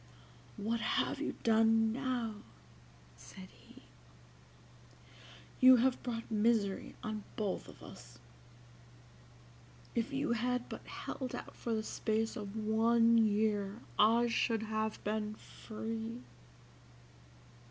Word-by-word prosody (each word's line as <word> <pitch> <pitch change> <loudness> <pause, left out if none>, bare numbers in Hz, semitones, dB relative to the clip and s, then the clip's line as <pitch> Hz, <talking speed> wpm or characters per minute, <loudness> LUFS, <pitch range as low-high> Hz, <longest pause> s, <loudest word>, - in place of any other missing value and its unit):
"What 225 +3 -1
have - - 0
you - - -2
done 225 0 +4
now?" 245 -4 -2 0.8
said - - -12
he; - - -18 1.8
"you 255 0 +9
have 250 +1 +2
brought 230 -2 -5
misery 215 -2 +1
on 215 -1 -4
both 205 -4 -2
of - - -14
us. 120 -1 -12 1.8
If 235 +4 -1
you 280 +1 -1
had 245 +1 0
but - - -8
held 260 -3 -5
out - - -8
for 230 -1 -2
the 220 - -2
space 220 0 -1
of 205 -1 -6
one 230 +2 +4
year 210 -1 +1 0.2
I 230 +3 +5
should 230 -1 +1
have 220 0 -2
been 210 0 -2
free. 225 +2 -6
225 Hz, 110 wpm, -34 LUFS, 215-235 Hz, 1.8 s, you